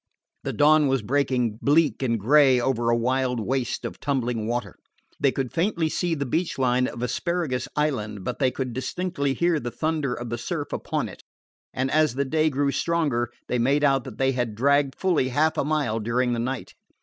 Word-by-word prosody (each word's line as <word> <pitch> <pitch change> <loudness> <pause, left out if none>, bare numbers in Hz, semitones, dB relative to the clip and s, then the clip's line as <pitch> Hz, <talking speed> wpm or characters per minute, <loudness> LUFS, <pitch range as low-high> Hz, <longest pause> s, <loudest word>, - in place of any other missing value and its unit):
The - - -2
dawn 150 0 +5
was 135 -4 +1
breaking 125 -3 0
bleak 150 +1 +3
and 115 -4 0
gray 130 +3 +5
over 120 -2 0
a 115 - +3
wild 125 +1 0
waste 125 +2 -2
of - - -6
tumbling 120 -6 -1
water. 115 -5 -3 0.4
They 140 -1 +3
could 130 -2 -3
faintly 170 -2 0
see 175 +1 -1
the 140 -2 -2
beach 165 +7 -1
line 125 -1 +2
of 120 - -6
Asparagus 150 0 -1
Island, 110 -10 -1
but 125 - -4
they 130 -3 +3
could 130 -1 -4
distinctly 140 +1 -2
hear 170 -2 +2
the 120 - -4
thunder 145 +1 -1
of 120 -1 -6
the 120 - -3
surf 150 0 -4
upon - - -2
it; - - -12 0.5
and 130 +1 -2
as 155 -4 +3
the 140 +1 0
day 155 +3 +2
grew 140 0 0
stronger 145 -9 0 0.2
they 125 - 0
made 140 +5 +2
out 135 -3 +3
that 125 -5 -9
they 135 0 +2
had 120 -4 -2
dragged 140 +3 +2
fully 170 -9 +1
half 155 +5 +2
a - - 0
mile 145 -7 0
during 120 +3 0
the 120 - -1
night. 125 +1 -4
135 Hz, 195 wpm, -25 LUFS, 120-150 Hz, 0.5 s, dawn